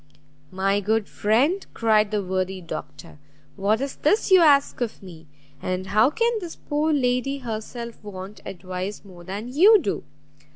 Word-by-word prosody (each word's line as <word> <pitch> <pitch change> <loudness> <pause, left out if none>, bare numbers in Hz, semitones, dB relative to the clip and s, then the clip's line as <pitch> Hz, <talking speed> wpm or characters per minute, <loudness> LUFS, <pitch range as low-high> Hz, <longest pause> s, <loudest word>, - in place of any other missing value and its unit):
"My 195 +2 0
good 215 +1 0
friend," 270 - +1
cried 215 -2 +3
the 210 -1 -1
worthy 185 0 -2
Doctor, 165 -2 -9 0.4
"what 205 +2 +1
is 275 0 -4
this 410 +6 +1
you 375 - +8
ask 285 -5 +4
of 230 -4 -3
me? 165 -4 -12 0.3
and 185 0 -3
how 215 +6 +4
can 465 +9 +1
this 350 -4 -7
poor 300 +1 -1
young 285 -4 +1
lady 250 +3 0
herself 235 -1 -6
want 195 0 -9
advice 185 +3 -6
more 180 -3 -13
than 205 +7 -6
you 405 +9 +7
do? 265 - -3
215 Hz, 160 wpm, -24 LUFS, 190-275 Hz, 0.4 s, you